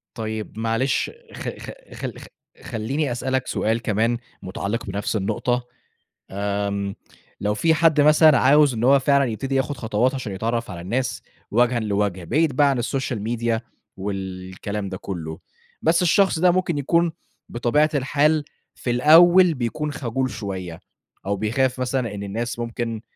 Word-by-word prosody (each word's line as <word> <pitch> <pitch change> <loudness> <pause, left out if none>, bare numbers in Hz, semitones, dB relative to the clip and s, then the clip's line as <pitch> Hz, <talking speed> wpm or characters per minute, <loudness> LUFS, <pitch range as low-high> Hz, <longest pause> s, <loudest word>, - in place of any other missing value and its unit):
طيب 110 -1 -5
معلش 115 +4 0 0.2
خ - - -6
خ - - -8 0.2
خل - - -6
خ - - -11 0.4
خلّيني 125 +4 -2
أسألك 130 +1 -1
سؤال 115 +2 -1
كمان 115 +2 +1 0.2
مُتعلِّق 100 +4 -3
بنَفْس 100 +2 -2
النقطة، 120 +5 -1 0.8
آمم 100 -1 -2 0.5
لو 105 +1 0
في 160 +8 +2
حد 160 -2 +4
مثلًا 150 0 +6
عاوز 140 0 +5
إن 115 +2 -2
هو 140 +2 +6
فعلًا 140 +1 +3
يبتدي 130 +4 -3
ياخُد 135 +1 0
خطوات 115 +3 0
عشان 115 -7 -4
يتعرّف 115 +3 -2
على 85 - -7
الناس 120 +9 -2 0.3
وَجهًا 120 +2 +2
لوَجْه 100 -4 -1
بعيد 155 - +1
بقى 145 - +5
عن 125 -3 0
الsocial 130 -3 -2
media 115 -1 0 0.4
والكلام 95 +1 -5
ده 95 - -5
كُلّه، 80 -5 -6 0.4
بس 170 +2 +3
الشخص 180 0 +3
ده 180 +1 +5
ممكن 175 -3 0
يكون 170 +4 +2 0.4
بطبيعة 135 +6 +2
الحال 145 +3 +2 0.3
في 120 - -4
الأول 170 +7 +6
بيكون 145 +5 -3
خجول 130 -1 -2
شوية 95 -6 -6 0.5
أو 100 - 0
بيخاف 125 +5 0
مثلًا 125 -4 -1
إن 100 - -5
الناس 115 +5 -4
ممكن 115 -1 -4
120 Hz, 150 wpm, -23 LUFS, 105-140 Hz, 0.8 s, مثلًا